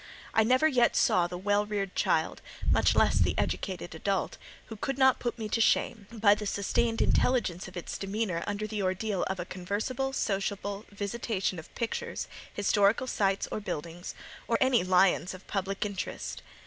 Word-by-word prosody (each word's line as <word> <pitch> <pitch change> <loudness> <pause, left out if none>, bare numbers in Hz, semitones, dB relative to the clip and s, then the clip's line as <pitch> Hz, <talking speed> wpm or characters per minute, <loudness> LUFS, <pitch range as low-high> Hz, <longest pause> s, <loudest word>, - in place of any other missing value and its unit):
I 220 - +5
never 255 +7 +4
yet 245 -5 +3
saw 175 -1 +3
the 180 - -6
well 205 +2 +2
reared 200 -2 -2
child, - - +1 0.3
much - - +4
less - - +4
the - - +2
educated 180 -3 -2
adult, 190 +4 -2 0.3
who 225 - -8
could 270 +5 -3
not 265 -1 +5
put 240 -1 -2
me 220 -2 -4
to 230 - +1
shame, 215 -1 +2
by 210 -3 +5
the 210 0 -3
sustained 225 +4 +1
intelligence 195 -9 +1
of 185 -1 -10
its 175 - -5
demeanour 195 -3 -2
under 205 +1 -2
the 215 -1 -3
ordeal 190 +1 -1
of 190 -1 -3
a 175 - -3
conversable, 210 +9 -2
sociable 200 -3 -2
visitation 200 -2 -2
of 160 - -12
pictures, 230 -2 -3 0.2
historical 205 +3 +2
sights 195 -5 0
or - - -2
buildings, 170 -3 -6 0.3
or 230 - +2
any 260 -6 +4
lions 185 0 +3
of 185 - -14
public 195 0 -2
interest. 120 - -4
205 Hz, 170 wpm, -29 LUFS, 185-225 Hz, 0.3 s, I